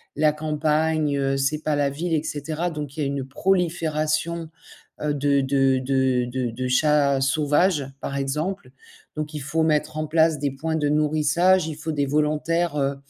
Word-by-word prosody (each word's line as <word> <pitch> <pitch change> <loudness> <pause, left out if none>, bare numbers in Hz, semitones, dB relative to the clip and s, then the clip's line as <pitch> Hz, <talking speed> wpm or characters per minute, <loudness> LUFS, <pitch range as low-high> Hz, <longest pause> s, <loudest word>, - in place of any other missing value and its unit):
la 150 +1 +3
campagne, 155 0 0
heu, 135 0 0
c'est 140 +3 0
pas 155 -1 0
la 145 -1 +1
ville 165 +5 -3
et 155 -1 +1
cetera, 155 +3 -3
donc 150 -3 -6
il 155 - -3
y - - +1
a - - 0
une 140 -1 -3
prolifération, 165 -1 0 0.5
heu, 150 -1 0
de 140 -1 +2
de 135 -1 +2
de 130 -1 +1
de 125 0 -2
de 130 +2 -4
chats 140 0 +3
sauvages, 145 +3 +2 0.2
par 140 - -4
exemple. 155 +9 -3 0.5
Donc 155 0 -4
il 150 - -5
faut 160 +4 0
mettre 155 -1 0
en 155 0 -2
place 160 -1 +3
des 140 -1 -1
points 160 +4 -3
de 150 -2 0
nourrissage, 155 +4 +2
il 155 - -5
faut 155 +1 -4
des 145 -2 0
volontaires, 150 +3 0
heu, 140 0 0
150 Hz, 185 wpm, -23 LUFS, 140-160 Hz, 0.5 s, la